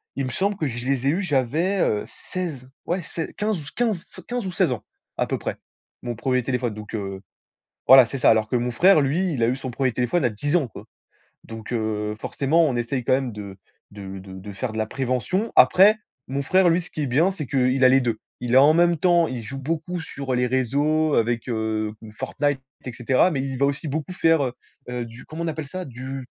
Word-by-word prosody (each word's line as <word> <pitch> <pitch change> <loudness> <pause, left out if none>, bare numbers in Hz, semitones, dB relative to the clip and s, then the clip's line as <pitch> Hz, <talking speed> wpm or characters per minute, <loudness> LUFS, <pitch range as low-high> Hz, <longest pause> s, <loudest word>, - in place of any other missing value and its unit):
il 135 - -1
me 130 - -4
semble 200 +6 0
que 155 -7 -2
je 120 +1 -5
les 135 -1 0
ai - - +5
eus 175 +7 +1
j'avais, 160 +5 0
heu, 105 - +1
16, 155 -9 -6 0.2
ouais, 180 +1 -1
sei 160 +1 -5
15 190 -8 -2
15 220 -7 -1 0.2
15 245 -4 -3
ou - - -3
16 160 - +1
ans 110 -4 -3 0.3
à - - +1
peu - - -1
près, - - -4 0.5
mon 120 -1 -3
1er 125 +1 0
téléphone. 125 -3 -1
Donc 105 0 -9
heu, 95 -2 -5 0.7
voilà, 130 -1 +9
c'est 135 - -5
ça. - - +4
Alors 110 -1 +3
que - - 0
mon 120 0 0
frère, 180 +4 +5
lui, 165 +5 0
il 115 -4 0
a - - +4
eu 130 - 0
son 130 -1 -6
1er 130 0 0
téléphone 125 +8 0
à 120 - +3
10 145 +10 -2
ans, 150 -7 +2
quoi. - - -11 0.6
Donc 115 +1 -9
heu, 105 -2 -2
forcément 155 +6 +2
on 130 - -1
essaye 120 +2 -2
quand - - +3
même 130 -2 0
de 100 -2 -8 0.3
de 95 -1 -8
de 95 0 -11
de 95 +2 -8
faire 110 +3 -4
de - - -5
la 110 - 0
prévention. 135 - -1
Après, 195 +4 +7 0.3
mon 135 +2 -2
frère, 185 +5 +4
lui, 170 +2 +2
ce 170 - -13
qui 155 - -4
est - - 0
bien, 160 +10 +3
c'est 155 -8 -6
qu'il 130 -1 +2
a - - +9
les 135 +1 +5
2. 115 -3 -1 0.2
Il 125 +1 0
a, - - +9
en 150 +3 +6
même 170 0 +4
temps, 175 0 +3
il 125 -3 -4
joue 135 +5 -7
beaucoup 165 +5 -3
sur 140 -4 -5
les 125 0 +1
réseaux 145 +5 +1
avec, 115 +1 0
heu, 110 -1 -1 0.2
Fortnite, 145 +1 -1 0.3
et 125 - -4
cetera, 130 +10 +2
mais 135 -3 -1
il 135 -1 -4
va 140 - +3
aussi 140 +3 -3
beaucoup 155 +4 -3
faire, 165 -4 +3
heu, 125 - -2 0.4
heu, 125 -1 -3
du 115 +2 -12
comment 165 +2 -6
on - - -2
appelle 155 -2 -4
ça? 185 +5 -6
Du 130 +1 -7
135 Hz, 235 wpm, -23 LUFS, 120-160 Hz, 0.7 s, voilà